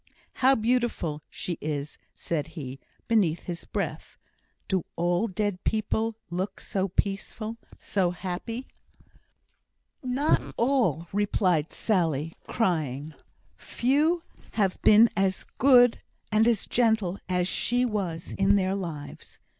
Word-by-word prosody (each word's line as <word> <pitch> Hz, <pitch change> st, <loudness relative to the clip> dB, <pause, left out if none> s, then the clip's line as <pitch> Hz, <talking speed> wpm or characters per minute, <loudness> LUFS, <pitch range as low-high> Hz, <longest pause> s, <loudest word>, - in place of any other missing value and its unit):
"How 265 Hz, +1 st, +6 dB
beautiful 225 Hz, -, 0 dB
she 175 Hz, -, -5 dB
is!" 145 Hz, -1 st, -4 dB, 0.2 s
said 155 Hz, -4 st, -2 dB
he, 135 Hz, -2 st, -6 dB, 0.3 s
beneath 195 Hz, -8 st, +2 dB
his 175 Hz, -1 st, -6 dB
breath. -, -, -4 dB, 0.5 s
"Do 190 Hz, -3 st, 0 dB
all 175 Hz, +5 st, +1 dB
dead 200 Hz, -1 st, -2 dB
people 220 Hz, +1 st, 0 dB, 0.2 s
look 185 Hz, +3 st, -3 dB
so 195 Hz, -1 st, -1 dB
peaceful 205 Hz, +4 st, -2 dB, 0.2 s
so 190 Hz, -3 st, 0 dB
happy?" 190 Hz, +8 st, -5 dB, 1.4 s
"Not 265 Hz, +4 st, 0 dB
all," 230 Hz, -, +2 dB
replied 185 Hz, -6 st, +1 dB
Sally, 165 Hz, -7 st, 0 dB
crying. 155 Hz, -, -1 dB, 0.4 s
"Few 305 Hz, +7 st, +1 dB, 0.3 s
has 195 Hz, -4 st, +1 dB
been 215 Hz, +2 st, +7 dB
as 195 Hz, -1 st, 0 dB
good 245 Hz, -3 st, +6 dB, 0.3 s
and 215 Hz, +1 st, +4 dB
as 230 Hz, -4 st, +2 dB
gentle 220 Hz, -6 st, +1 dB
as 180 Hz, -1 st, +1 dB
she 245 Hz, +6 st, +1 dB
was 185 Hz, -8 st, -3 dB
in 195 Hz, +1 st, +3 dB
their 190 Hz, -1 st, +1 dB
lives." 165 Hz, -7 st, -6 dB
195 Hz, 115 wpm, -27 LUFS, 175-230 Hz, 1.4 s, been